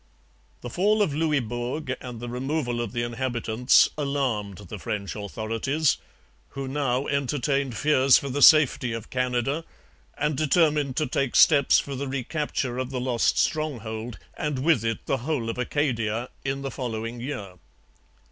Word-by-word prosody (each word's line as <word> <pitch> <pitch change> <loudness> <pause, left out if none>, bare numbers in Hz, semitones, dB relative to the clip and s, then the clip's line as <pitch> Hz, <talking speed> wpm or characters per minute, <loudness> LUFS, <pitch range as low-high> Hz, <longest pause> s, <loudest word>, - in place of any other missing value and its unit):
The 120 - -6
fall 210 - +3
of 155 - -1
Louisbourg 130 -2 -1
and 125 -2 -7
the 120 - -6
removal 125 0 -2
of 115 -4 -4
the 120 +1 -2
inhabitants 120 0 +2
alarmed 130 -9 -1
the 105 0 -9
French 100 +1 -4
authorities, 115 +8 -1 0.6
who 135 -1 -3
now 135 -1 0
entertained 140 -2 -1
fears 135 -2 +5
for 140 - -4
the 140 +2 -2
safety 140 -6 +6
of 115 -1 -7
Canada 125 +4 0 0.5
and 150 0 0
determined 150 -2 +2
to 155 - +2
take 135 -1 -1
steps 145 -4 +6
for 140 - -2
the 135 +1 -4
recapture 130 -1 -2
of 130 -1 -2
the 130 -1 -3
lost 125 -2 +1
stronghold, 120 -7 -2 0.2
and 150 -5 -2
with 160 -8 +3
it 115 0 -2
the 135 - 0
whole 125 -3 -2
of 120 - -8
Acadia, 120 -4 -1
in 135 0 -2
the 135 - -3
following 115 -2 -4
year. 105 -9 -6
130 Hz, 150 wpm, -25 LUFS, 120-145 Hz, 0.6 s, safety